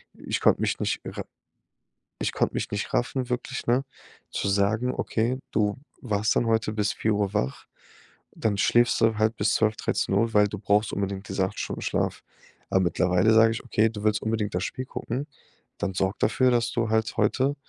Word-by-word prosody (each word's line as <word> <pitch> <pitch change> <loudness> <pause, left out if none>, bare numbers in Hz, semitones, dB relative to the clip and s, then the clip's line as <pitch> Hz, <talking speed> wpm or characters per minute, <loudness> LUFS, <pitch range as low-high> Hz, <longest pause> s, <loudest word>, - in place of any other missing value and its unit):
Ich - - -3
konnte - - +4
mich - - 0
nicht - - -1
re - - -5 1.0
ich - - -1
konnte - - 0
mich - - -2
nicht 105 - -3
raffen 125 +1 0
wirklich, 125 0 -3
ne, 125 +3 +2 0.5
zu - - -2
sagen: 110 +6 +1
„Okay, 120 +3 -1
du 105 0 +1 0.2
warst 105 -3 0
dann 120 - +2
heute 110 -1 +1
bis 105 -1 0
4:00 105 -2 0
wach. 65 -8 -2 0.7
Dann 105 -3 0
schläfst 120 +3 +3
du 115 -1 +3
halt 110 +1 +2
bis 105 0 +1
12, 110 -1 +2
13:00 115 +4 0
weil 105 0 +5
du 105 - -6
brauchst 105 +2 +1
unbedingt 100 +1 -3
diese 95 - 0
8 - - -9
Stunden - - -4
Schlaf.“ - - -1 0.5
Aber 95 - +3
mittlerweile 90 +4 +3
sage 115 0 +6
ich: 115 - -5
„Okay, 110 -2 +2
du 105 -2 -7
willst 110 0 +2
unbedingt 110 -3 -1
das 90 - 0
Spiel 130 - -5
gucken, 130 +2 -4 0.5
dann 100 -2 -2
sorge 95 +1 0
dafür, 130 +3 +3
dass 120 -1 +1
du 115 -2 0
halt 110 0 0
heute, 130 +6 +2
110 Hz, 185 wpm, -26 LUFS, 100-115 Hz, 1.0 s, sage